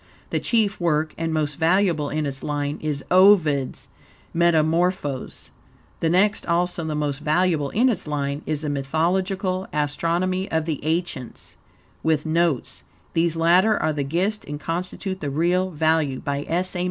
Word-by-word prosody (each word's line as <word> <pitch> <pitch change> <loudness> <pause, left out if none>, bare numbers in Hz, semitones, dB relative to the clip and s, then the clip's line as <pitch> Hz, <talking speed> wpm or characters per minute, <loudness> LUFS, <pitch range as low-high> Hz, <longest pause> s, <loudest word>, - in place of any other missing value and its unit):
The - - +1
chief 220 -4 +1
work, 155 -2 0
and 165 0 -2
most 150 -2 -1
valuable 165 -3 +2
in 155 0 -1
its 135 -1 -3
line, 145 0 -2
is 150 -2 -2
Ovid's 175 -8 +4 0.5
"Metamorphoses." 165 -3 +1 0.5
The 165 - +1
next, 200 +5 +2
also 175 0 0
the 155 -1 -2
most 145 -2 -2
valuable 155 -1 +1
in 240 - +2
its 215 -10 -1
line, 140 -1 -2
is 155 -1 -1
"The 150 - -3
Mythological 185 +7 -1
Astronomy 170 +6 -1
of 160 -1 0
the 155 -4 -3
Ancients," 160 -6 -3 0.5
with 160 -1 +1
notes 160 -4 0 0.3
(these 165 0 +1
latter 180 +6 +4
are 155 - 0
the 145 -1 -1
gist 185 +9 -1
and 145 0 -6
constitute 185 +4 -4
the 145 - -3
real 175 +6 +1
value), 155 -4 +1
by 140 -1 -3
S. 180 +3 +1
A. - - -2
160 Hz, 155 wpm, -23 LUFS, 150-180 Hz, 0.5 s, Ovid's